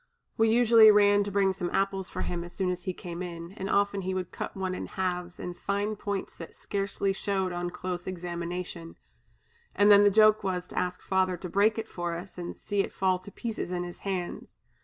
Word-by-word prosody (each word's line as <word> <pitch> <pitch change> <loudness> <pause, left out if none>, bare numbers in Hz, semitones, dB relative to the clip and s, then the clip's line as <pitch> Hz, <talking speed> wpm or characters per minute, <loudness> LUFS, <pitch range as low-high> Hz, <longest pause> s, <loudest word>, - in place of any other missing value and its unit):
We 225 0 +3
usually 230 -1 +7
ran 205 -1 +5
to 200 - -4
bring 195 -1 +2
some 180 -2 -3
apples 195 -1 0
for - - -4
him 170 -1 -3
as 175 - -10
soon 185 -2 0
as 180 -1 -5
he 185 - 0
came 175 -1 -7
in, 170 -1 -6
and 195 0 -5
often 200 0 +2
he 185 0 -2
would 185 -2 -3
cut - - -6
one 190 -1 -2
in - - -5
halves 180 -2 -3
in 180 - -5
fine 200 +4 -2
points 200 -1 -4
that 165 - -9
scarcely 195 -1 -2
showed 190 -1 -1
on 175 0 -3
close 180 0 -5
examination, 175 -1 -5 0.8
and 205 +1 +6
then 205 0 +8
the 205 - +7
joke 215 +1 +5
was 180 -2 -1
to - - -13
ask 180 0 -3
Father 185 -1 +1
to 180 +1 -7
break 210 +4 +3
it 225 0 -3
for 175 -3 -3
us 180 +2 -8
and 175 - -6
see 205 -1 -3
it - - -5
fall 185 -1 +2
to 185 +2 -11
pieces 225 -5 -4
in 180 -1 -1
his 175 0 -8
hands. 185 -3 -4
190 Hz, 220 wpm, -28 LUFS, 180-200 Hz, 0.8 s, then